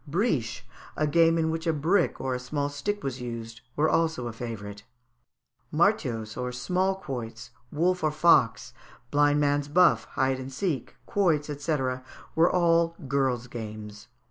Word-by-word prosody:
Briche, 140 - 0 0.3
a 155 - +2
game 165 +2 +4
in 160 -1 +1
which 165 +1 -3
a 165 - +3
brick 170 +5 +1
and 130 - -2
a 125 - -2
small 140 +3 -2
stick 205 +9 -3
was 130 -2 -4
used, 115 -1 -6
were 155 +2 +3
also 160 -6 +1
a 120 - -4
favourite. 105 -3 -7 0.9
Martiaus, 140 - +1
or 125 0 -3
small 180 +10 0
quoits, 125 -7 -7 0.2
wolf 180 +3 +1
or 155 - +3
fox, 150 -6 +3 0.4
blind 145 0 +4
man's 145 0 +1
buff, 145 -8 +4
hide 130 -1 +1
and 130 +1 -7
seek, 140 - -3
quoits, 160 -7 +1
&c., 150 +2 -1 0.6
were 165 +2 +4
all 170 -1 +3
girls' 130 -3 0
games. 110 -3 -8
145 Hz, 150 wpm, -27 LUFS, 125-165 Hz, 0.9 s, game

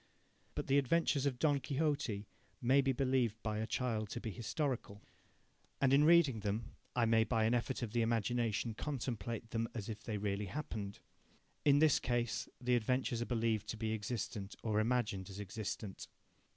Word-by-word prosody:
But - - -2
the 140 +1 +4
adventures 145 0 +2
of 130 -3 -1
Don 145 0 +3
Quixote 140 -6 -1 0.3
may 130 +3 +4
be 135 0 +2
believed 130 -4 +1
by 110 -1 -1
a 110 - -2
child 110 -3 -1
to - - -4
be 110 - -4
historical. 120 - -3 0.8
And 135 -1 +4
in 145 +2 +6
reading 160 -8 +6
them 105 +3 -3 0.2
I 120 -2 +3
may 115 0 +4
by 110 -1 +1
an 110 +2 +3
effort 125 +1 0
of 110 - -3
the 120 0 +1
imagination 115 0 0
contemplate 115 -4 -4
them 115 0 0
as 105 -3 -4
if 110 - -5
they 110 -2 -3
really 100 0 -2
happened. 105 -4 -5 0.7
In 145 -1 +6
this 155 -1 +5
case, 120 -2 -1
the 125 0 +2
adventures 120 0 0
are - - 0
believed 115 -3 0
to 110 - -4
be 110 0 -1
existent 105 -2 -4
or 110 -2 +1
imagined 110 -4 0
as 95 +1 -8
existent. 105 0 -5
115 Hz, 175 wpm, -36 LUFS, 110-130 Hz, 0.8 s, in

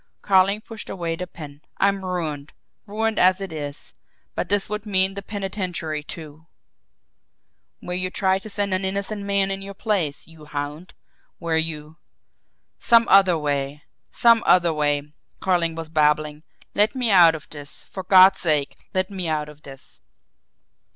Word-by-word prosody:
Carling 195 +2 +3
pushed 220 -1 -9
away 170 -3 -3
the 180 +2 -6
pen. 150 -4 -11 0.2
"I'm 195 0 +1
ruined 160 -5 -4 0.3
ruined 220 +2 -1
as 185 +1 +4
it 195 -4 -6
is. 145 -2 -7 0.4
But - - -3
this 205 -1 +1
would 210 0 -5
mean 190 -1 +2
the 200 - -6
penitentiary, 190 -6 -4
too 155 +1 -11 0.7
" - - -51
"Where 180 - -4
you 185 0 -1
tried 190 0 0
to 215 - -9
send 200 -1 -1
an 185 +1 -1
innocent 200 +2 -3
man 200 -1 +1
in 195 0 -4
your 200 0 -8
place, 185 -10 -1
you 160 -2 -15
hound; 150 +4 -6 0.4
where 170 -1 -2
you 155 -1 -5 0.4
" - - -50 0.3
"Some 230 -1 +5
other 190 -3 +6
way 145 0 -3 0.3
some 230 -1 +4
other 175 -2 +5
way!" 145 -1 -1 0.3
Carling 170 -3 +1
was 165 -1 -6
babbling. 150 -1 +1 0.3
"Let 210 +3 +2
me 245 -4 0
out 170 -4 +7
of 155 - -10
this 145 -2 -11
for 190 - -8
God's 185 +1 +6
sake, 150 -4 +1 0.2
let 185 +1 0
me 185 -3 -4
out 150 -1 -2
of 150 0 -15
this!" 135 -2 -13
180 Hz, 165 wpm, -23 LUFS, 150-195 Hz, 0.7 s, out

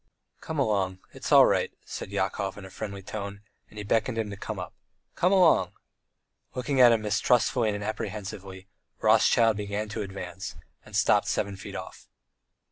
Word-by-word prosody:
"Come 160 - -6
along, 100 -8 +1 0.2
it's - - -6
all - - +9
right," - - +1
said - - -6
Yakov 95 0 -2
in 100 - -9
a 95 - -11
friendly 100 0 -6
tone, 100 0 -6 0.3
and 105 - -16
he 105 - -4
beckoned 115 +3 0
him 110 -2 -2
to - - -5
come 105 +1 -6
up. 90 -1 -6 0.4
"Come 180 - +2
along!" 170 - +4 0.8
Looking 130 +1 +1
at 120 -1 +9
him 115 -2 +2
mistrustfully 110 +2 +2
and 105 0 -3
apprehensively, 100 -3 -6 0.3
Rothschild 115 -2 +4
began 105 +1 -3
to 105 - -4
advance, 95 -2 -6 0.3
and - - -11
stopped - - +3
seven 100 0 -1
feet 95 - -9
off. - - -8
105 Hz, 165 wpm, -27 LUFS, 95-115 Hz, 0.8 s, all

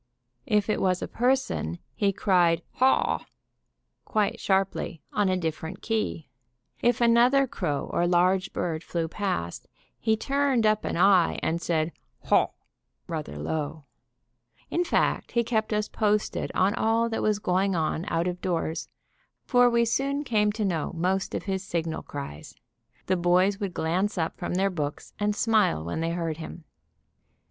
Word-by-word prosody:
If 210 -4 +2
it 215 - 0
was 185 -1 +1
a - - -3
person, 250 - 0 0.2
he 200 -1 +1
cried 175 -4 +2
"Haw!" 260 +1 +3 0.8
quite 210 -2 0
sharply, 190 -4 0
on 205 -2 +2
a 185 - +1
different 160 0 -4
key. 220 -8 -2 0.5
If 240 0 +2
another 240 +4 +5
crow 160 - -3
or 175 - +2
large 185 +2 +2
bird 160 -2 -2
flew 165 -2 -2
past, 170 - -3 0.3
he 220 -1 +1
turned 275 -1 +1
up 215 0 +2
an - - -2
eye 185 -2 +4
and 170 +1 0
said 160 -1 0 0.3
"Hawh!" - - +4 0.6
rather 75 +2 -5
low. 145 - -3 0.9
In 350 - +2
fact, 350 - 0
he 235 - +3
kept 220 -2 -1
us 210 0 0
posted 210 -1 0
on 190 +2 +3
all 225 +1 +2
that 225 - -2
was 215 -1 +2
going 190 0 +1
on 160 +1 -1
out 165 -1 0
of 180 0 -3
doors, 165 -3 -2 0.6
for 245 -1 +5
we 235 0 +3
soon 275 +5 0
came 210 -6 +2
to 215 0 -1
know 165 -6 -1
most 185 +3 0
of - - -3
his 190 -2 -2
signal 165 -3 -2
cries. 140 - -8 0.5
The 185 - +1
boys 180 +3 +3
would 195 -4 -4
glance 185 +6 0
up 160 -1 -1
from 180 - -4
their 195 +1 +2
books 150 -5 -4
and 205 0 +1
smile 210 - +2
when 85 - -3
they 165 0 0
heard 165 -2 -2
him. 165 +1 -8
190 Hz, 155 wpm, -27 LUFS, 165-220 Hz, 0.9 s, another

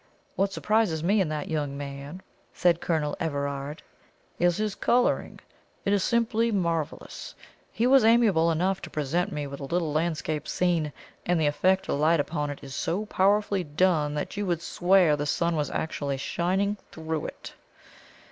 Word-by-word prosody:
"What 195 0 +1
surprises 205 -6 +1
me 200 +4 +3
in 175 - 0
that 150 -1 -3
young 145 -3 -2
man," 140 +5 -7 0.3
said 175 -2 +2
Colonel 155 -3 0
Everard, 140 -1 -3 0.6
"is 175 -1 +3
his 215 -1 -1
colouring. 245 +4 +1 0.5
It 200 - +2
is 200 -2 +2
simply 230 -1 +1
marvellous. 170 -6 -3 0.4
He 230 - 0
was 265 -1 +6
amiable 220 -8 +4
enough 180 +4 0
to - - -8
present 165 +7 -1
me 150 -4 -3
with 140 0 -7
a 140 - -5
little 165 0 -1
landscape 155 -1 -1
scene; 170 -4 0 0.3
and 175 -1 +1
the 155 - +2
effect 185 +6 +2
of 140 - -1
light 160 +2 +4
upon 150 0 -1
it 145 - -7
is 135 -1 -8
so 185 +10 -1
powerfully 200 -1 +2
done 150 -1 +1
that 150 - -4
you 205 -1 -2
would 170 -2 -1
swear 180 -4 +3
the 145 0 -3
sun 170 +3 +1
was 150 -2 -1
actually 145 -3 -2
shining 190 +8 0
through 160 -1 -3
it." - - -10
170 Hz, 165 wpm, -27 LUFS, 150-195 Hz, 0.6 s, was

